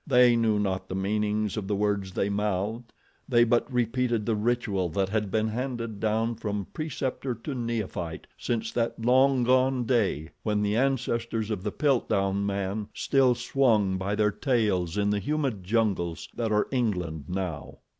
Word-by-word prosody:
They 125 -1 +6
knew 110 -2 +2
not 95 -2 -1
the 95 - -3
meanings 105 +2 0
of 100 -3 -3
the 105 - 0
words 100 -2 0
they 100 - 0
mouthed; 105 +3 -2 0.4
they 120 -2 +5
but 120 +3 +1
repeated 120 -2 0
the 115 - +1
ritual 105 -5 0
that 95 +4 0
had 105 -1 -1
been 110 +2 +1
handed 115 -2 -4
down 110 +2 +1
from 105 -3 -3
preceptor 135 -4 -3
to 115 +6 -6
neophyte 110 -9 -3
since 115 -2 -2
that 115 -1 -1
long 130 +2 +4
gone 130 +1 +3
day 100 - +1
when 105 -1 0
the 105 +1 +1
ancestors 115 -3 0
of 105 -4 -2
the 105 +1 -2
Piltdown 100 -9 +1
man 100 +1 -2
still 130 -3 +3
swung 115 -6 +2
by 100 +2 -1
their 105 0 +2
tails 105 - 0
in 100 0 +2
the 105 - +1
humid 135 -4 -1
jungles 95 -5 0
that 115 -2 -2
are 105 0 +2
England 90 - -1
now. 90 -5 -4
110 Hz, 165 wpm, -27 LUFS, 100-120 Hz, 0.4 s, They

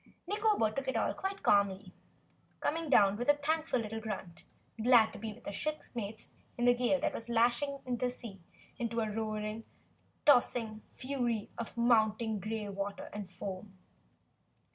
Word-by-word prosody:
Nikobo 415 - +2
took 275 -1 -3
it 260 - 0
all - - +1
quite 390 +1 -4
calmly, 200 -2 +2 0.7
coming 325 0 -1
down 200 -6 +5
with 245 +4 -2
a 290 - +7
thankful 310 -1 0
little 225 0 -4
grunt, 200 -6 -6 0.4
glad 230 -2 +6
to - - -8
be 220 +1 -4
with 235 +3 -14
her - - -3
shipmates 225 -5 -4 0.3
in 240 - +1
the 245 - +7
gale 250 +3 +2
that - - 0
was 230 +1 -2
lashing 240 +4 +2
the 250 0 0
sea 225 -6 -8 0.4
into 235 -1 -1
a 215 -1 -1
rolling, 215 0 -3 0.6
tossing 240 -5 +3
fury 245 -5 -2
of 235 0 -6
mounting 220 -2 +3
gray 215 +1 -3
water 200 0 -5
and 205 -3 -6
foam. 190 +1 -7
225 Hz, 155 wpm, -33 LUFS, 210-250 Hz, 0.7 s, a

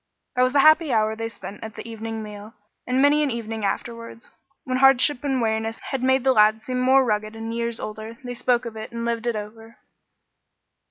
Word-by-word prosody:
That 250 - +2
was 255 +2 +2
a 280 - +6
happy 310 0 +5
hour 220 -1 +2
they 225 0 -4
spent 205 -1 -10
at 220 0 -8
the - - -8
evening 225 -1 -5
meal, 210 +1 -10 0.3
and 255 +2 +2
many 290 +1 +4
an 295 - +1
evening 225 -2 -4
afterwards, 230 +3 -5 0.3
when 255 -1 -1
hardship 270 +1 +4
and 270 -2 0
weariness 225 0 -1
had 270 -2 -2
made 260 0 +2
the 265 -1 +4
lads 215 0 +4
seem 255 -1 -2
more 260 +1 +4
rugged 215 -1 -1
and 225 0 -5
years 235 0 -2
older, 220 +2 -7
they 245 0 -5
spoke 245 0 0
of 230 -1 -6
it 220 +1 -7
and 235 0 -4
lived 235 0 -2
it 235 - 0
over. 225 +2 -8
230 Hz, 210 wpm, -23 LUFS, 220-255 Hz, 0.3 s, a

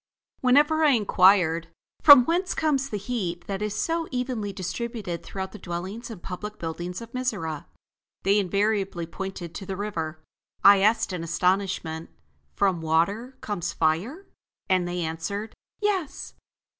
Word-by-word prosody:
Whenever 295 +5 +4
I 295 -3 +6
inquired: 185 -6 +4 0.3
"From 285 -5 +10
whence 360 +5 0
comes 275 -4 +1
the 210 - -2
heat 195 -5 -3
that 195 0 -4
is 210 0 -2
so 330 0 -1
evenly 250 -5 -2
distributed 190 0 -4
throughout 190 -1 -6
the 210 - -10
dwellings 185 +7 -5
and 215 -6 -9
public 210 +3 -6
buildings 175 +4 -5
of 230 0 -10
Mizora?" 205 - -3 0.6
they 200 +2 +4
invariably 200 -2 0
pointed 175 -1 -6
to 195 - -7
the 190 - -4
river. 165 -6 -4 0.4
I 200 0 +8
asked 215 0 +2
in 175 -2 -3
astonishment: 175 -2 -1 0.5
"From 190 -4 +1
water 200 +11 0
comes 175 -5 -3
fire?" 190 - 0 0.4
And 185 -2 +2
they 175 0 -3
answered: 170 +7 -4 0.3
"Yes." 380 -8 -1
200 Hz, 140 wpm, -26 LUFS, 175-235 Hz, 0.6 s, From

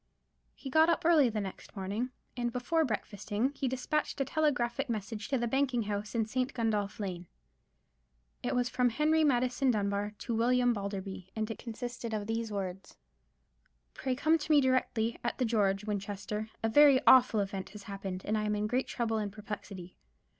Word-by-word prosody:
He 270 - -8
got 315 +3 +5
up 335 - +1
early 310 -7 +6
the 220 -1 -2
next 195 +1 -7
morning, 205 +6 -2 0.3
and 240 -1 -1
before 285 +7 +1
breakfasting 215 0 -2
he 275 - -2
despatched 260 +5 -1
a 275 - +1
telegraphic 275 -3 0
message 215 -1 -4
to 270 - +1
the 240 - 0
banking 260 -1 +1
house 210 +2 -4
in 225 -1 +2
St. 255 +4 -2
Gundolph 215 -4 -1
Lane. 180 -4 -4 1.1
It - - -1
was 245 -1 +2
from 250 0 +2
Henry 305 +6 +2
Maddison 255 -1 +2
Dunbar 205 -1 0
to 235 - -4
William 245 +2 +3
Balderby, 195 -2 -5
and 220 0 -2
it - - -7
consisted 235 -1 -5
of 210 -1 -3
these 225 0 -2
words:— 190 -2 -5 1.0
"_Pray 260 -1 -2
come 315 +4 +3
to 310 - -3
me 300 - +7
directly, 255 -4 +1
at 240 - -2
the 255 - +1
George, 205 -3 +1
Winchester. 210 +1 -4
A - - +3
very 280 +2 +7
awful 250 -4 +7
event 195 -1 -3
has 210 -1 -11
happened; 195 -2 -5
and 215 - 0
I 215 - -1
am 210 0 0
in 210 0 -1
great 250 +5 0
trouble 225 -2 -1
and 205 -2 -3
perplexity. 205 -3 -8
225 Hz, 180 wpm, -31 LUFS, 205-255 Hz, 1.1 s, me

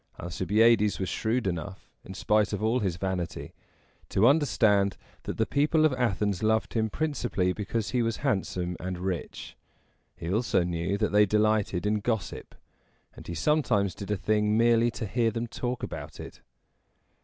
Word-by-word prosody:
Alcibiades 105 +5 +2
was 95 - -2
shrewd 115 +1 -1
enough, 95 +2 -4 0.2
in 95 - -9
spite 105 +1 +1
of 105 +1 -3
all 115 +3 +2
his 95 -6 -2
vanity, 90 -2 -4 0.6
to 100 - +3
understand 110 -9 +3 0.3
that - - -4
the - - +2
people 150 +3 +2
of 155 - +3
Athens 105 -6 0
loved 110 0 +1
him 110 -1 0
principally 120 -10 -1
because 105 +2 -3
he 125 - +1
was 115 -1 -1
handsome 90 -2 -1
and 90 0 -4
rich. 90 -2 -5 0.6
He 85 +2 -4
also 110 -4 +1
knew 85 +3 -2
that 105 0 0
they 105 0 +5
delighted 105 -3 +1
in 105 0 +1
gossip, 110 -3 -3 0.6
and - - -12
he 85 - -5
sometimes 105 - +1
did 100 - -8
a 105 - 0
thing 105 +1 +1
merely 115 0 +4
to 115 - -5
hear 115 +3 +1
them 115 +1 -3
talk 120 +1 -4
about - - -7
it. - - -10
105 Hz, 165 wpm, -27 LUFS, 95-115 Hz, 0.6 s, they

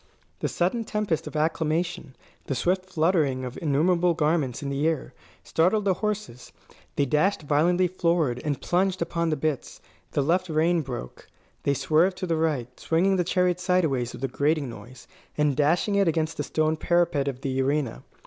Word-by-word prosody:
The - - -1
sudden 190 +7 0
tempest 210 -7 -2
of - - -8
acclamation, 160 -1 -1 0.3
the 135 - -1
swift 185 +6 0
fluttering 155 -7 +1
of 125 - -6
innumerable 170 +3 +2
garments 150 -5 0
in 140 - -3
the 140 +3 0
air, 160 -4 -2 0.3
startled 190 +6 +1
the 195 - +3
horses. 210 - -4 0.4
They 145 - +2
dashed 155 +7 +1
violently 170 +5 +2
forward, 170 -8 0
and 145 -3 -1
plunged 185 0 +1
upon 170 0 -1
the 155 - +1
bits. 150 -2 -3 0.3
The 145 - +1
left 180 +5 +1
rein 165 +2 +2
broke. 125 - -7 0.3
They 140 - +1
swerved 160 +7 +2
to - - -3
the 170 -2 0
right, 145 -6 -1
swinging 190 +4 +2
the 180 - +2
chariot 180 0 +1
sideways 160 -10 +1
with - - -9
a - - +2
grating 145 0 0
noise, 120 +3 -12 0.3
and 150 -2 +2
dashing 160 +8 +2
it 200 -2 +3
against 160 0 0
the - - -1
stone 155 0 0
parapet 170 -4 +1
of 135 -2 -3
the 135 -1 -1
arena. 140 -2 -1
160 Hz, 175 wpm, -26 LUFS, 140-180 Hz, 0.4 s, the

